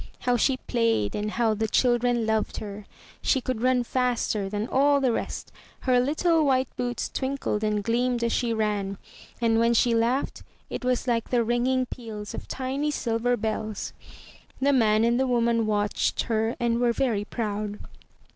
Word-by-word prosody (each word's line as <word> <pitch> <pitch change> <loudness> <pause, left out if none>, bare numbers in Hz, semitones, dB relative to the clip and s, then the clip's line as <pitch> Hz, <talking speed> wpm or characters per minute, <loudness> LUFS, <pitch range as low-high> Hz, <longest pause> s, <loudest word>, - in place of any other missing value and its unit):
How 245 0 +2
she 255 +3 +2
played 230 - 0
and 210 0 -2
how 225 0 +1
the 220 +1 -1
children 240 0 +2
loved 220 0 0
her. 205 -1 -7 0.3
She 270 - +2
could 255 -3 -3
run 255 0 +3
faster 240 -5 0
than 210 +2 -2
all 280 +2 +3
the 260 -3 +2
rest. - - -4 0.3
Her 250 -1 +3
little 315 +5 +2
white 265 -2 +1
boots 245 -1 -2
twinkled 265 -5 -2
and 210 -1 0
gleamed 240 +2 0
as 235 - +1
she 240 0 0
ran, 205 -3 -1 0.4
and 225 -1 +2
when 230 +1 +3
she 235 +1 +3
laughed, 235 +4 0 0.3
it - - -4
was 250 0 0
like 230 -2 0
the 240 -2 +2
ringing 245 +3 +1
peals 220 -4 -7
of - - -7
tiny 270 +3 -2
silver 245 -3 0
bells. 215 -1 -3 0.7
The 280 +1 +3
man 220 -4 +4
and 235 +1 +2
the 265 - +2
woman 235 -2 +2
watched 205 -1 0
her 225 +1 0
and 235 -1 +1
were 240 -1 +2
very 230 -6 0
proud. 210 -2 -3
235 Hz, 170 wpm, -26 LUFS, 220-255 Hz, 0.7 s, man